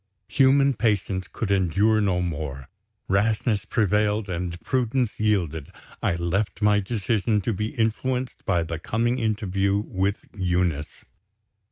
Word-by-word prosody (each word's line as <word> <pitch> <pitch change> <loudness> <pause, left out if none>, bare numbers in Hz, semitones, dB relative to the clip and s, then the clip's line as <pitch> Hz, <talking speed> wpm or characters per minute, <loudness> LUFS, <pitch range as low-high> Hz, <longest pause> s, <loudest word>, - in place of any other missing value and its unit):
Human 135 +1 +4
patience 100 -5 0
could 105 -4 -3
endure 100 +4 +3
no 90 -3 +1
more. 75 -6 -4 0.4
Rashness 105 +1 +1
prevailed 105 0 +1
and 85 -1 -3
prudence 125 -2 0
yielded 85 -9 0 0.3
I - - +1
left 90 +3 -1
my 105 0 +5
decision 105 +1 0
to 115 - -1
be 105 +3 -3
influenced 125 +3 -1
by 85 -1 +1
the 80 0 -5
coming 120 +7 0
interview 100 -3 0
with 100 -1 -2
Eunice. 90 -5 -1
100 Hz, 125 wpm, -25 LUFS, 90-110 Hz, 0.4 s, my